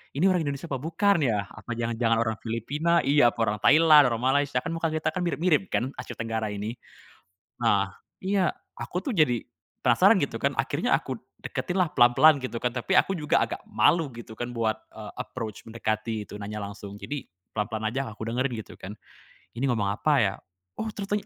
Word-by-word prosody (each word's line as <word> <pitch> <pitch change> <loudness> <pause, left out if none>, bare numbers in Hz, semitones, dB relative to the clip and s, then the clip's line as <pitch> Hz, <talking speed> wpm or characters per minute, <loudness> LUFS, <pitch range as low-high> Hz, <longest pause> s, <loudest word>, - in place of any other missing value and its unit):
Ini 165 +7 +3
orang 180 -3 +2
Indonesia 140 +3 -4
apa 135 -4 -3
bukan 165 +4 +2
ya? 105 -6 0
Apa 120 - -10
jangan-jangan 115 0 0
orang 110 -1 0
Filipina 145 +10 0
iya, 140 -4 +5
orang 110 -3 -1
Thailand, 155 -1 +7
orang 115 0 -2
Malaysia 145 -3 +1
kan 125 - -5
muka 165 -1 -1
kita 155 0 0
kan 180 - -3
mirip-mirip 170 -1 +2
kan, 130 +3 0
Asia 125 - -7
Tenggara 115 -1 -2
ini. 105 +3 -4 0.9
Nah 100 -3 +2 0.3
iya 190 -1 +1 0.2
aku 180 - -4
tuh 270 - -1
jadi 125 -8 +3 0.4
penasaran - - +5
gitu - - -2
kan - - +1
akhirnya - - -1
aku - - -1 0.3
deketin 185 +1 -2
lah 180 - +3
pelan-pelan 125 +5 +7
gitu 120 -2 -4
kan, 125 - 0
tapi 125 +10 -2
aku 195 - -3
juga 150 -3 +2
agak - - -6
malu 165 -5 +2
gitu 115 -1 -10
kan 120 0 -4
buat, 110 -2 0 0.2
eee, 110 -1 -9
approach 115 -4 -6
mendekati 110 -1 -3
itu - - -8
nanya 105 +1 -5
langsung. 100 0 -8
Jadi, 145 -3 -5 0.2
pelan-pelan 110 0 -2
aja 135 +3 -2
aku 110 - -9
dengerin 130 +2 0
gitu - - -15
kan, 100 +2 -8 0.6
ini 130 - 0
ngomong 110 -6 +1
apa 130 +9 +1
ya? 100 -3 +2 0.4
Oh - - -3
ternyatanya 205 0 -3
125 Hz, 185 wpm, -26 LUFS, 110-155 Hz, 0.9 s, Thailand